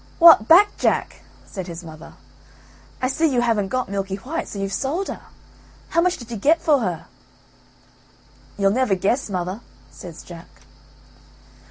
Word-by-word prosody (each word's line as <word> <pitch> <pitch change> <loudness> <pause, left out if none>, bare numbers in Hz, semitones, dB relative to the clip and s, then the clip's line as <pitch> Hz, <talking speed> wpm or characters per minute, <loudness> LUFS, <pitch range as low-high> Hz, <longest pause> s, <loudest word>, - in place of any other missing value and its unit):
"What 330 -10 +8
back, 395 +5 +6
Jack?" - - -1 0.2
said 190 -3 -7
his 170 0 -8
mother; 160 -1 -12 0.9
"I - - +3
see 320 +5 +1
you 245 -2 +1
haven't 225 -5 +1
got 255 +5 -2
Milky 195 -1 -3
white, 285 +11 -5
so - - -8
you've 195 0 -3
sold 320 +9 -2
her. - - -6 0.7
How 335 - +2
much 365 +1 +1
did 235 -1 -11
you 230 - -4
get 305 +11 +3
for 295 -3 +3
her?" 180 -8 -3 1.5
"You'll 195 -1 +2
never 240 -3 +1
guess, 210 +7 -1
mother," 185 +3 -4 0.3
says 170 +3 -11
Jack. 170 -1 -11
215 Hz, 155 wpm, -22 LUFS, 190-275 Hz, 1.5 s, What